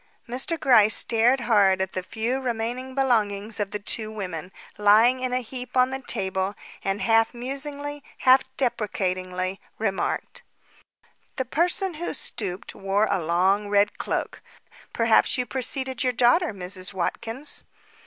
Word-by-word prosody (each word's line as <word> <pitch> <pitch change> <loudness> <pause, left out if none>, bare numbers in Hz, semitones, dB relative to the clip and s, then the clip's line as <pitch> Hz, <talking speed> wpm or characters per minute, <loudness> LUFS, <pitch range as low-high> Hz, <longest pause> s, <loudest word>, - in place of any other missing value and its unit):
Mr. 265 +7 -2
Gryce 230 -7 +5
stared 240 +3 +3
hard 200 -5 +4
at 190 0 -2
the 185 - -3
few 230 +7 -2
remaining 245 +2 -3
belongings 220 -5 0
of 205 -1 -1
the 210 - -3
two 215 +2 -1
women, 185 -5 -6 0.3
lying 220 +5 +5
in 255 0 -2
a 250 0 0
heap 250 +2 -6
on 255 +1 +4
the 265 0 -4
table, 190 -3 -2 0.3
and 195 +1 -1
half 225 +1 +3
musingly, 285 +3 -5
half 260 +1 +6 0.2
deprecatingly, 185 -6 -2 0.2
remarked: 220 - -2 0.9
"The 260 - -2
person 350 - 0
who 345 - -1
stooped 190 -3 -3
wore 195 +2 +1
a 190 -3 +1
long 190 +5 +1
red 205 0 +2
cloak. - - -3 0.5
Probably 230 -1 +4
you 250 - -1
preceded 260 +2 0
your 250 -1 +1
daughter, 255 +9 +3
Mrs. 185 0 -4
Watkins." 225 +9 -3
225 Hz, 140 wpm, -25 LUFS, 195-260 Hz, 0.9 s, half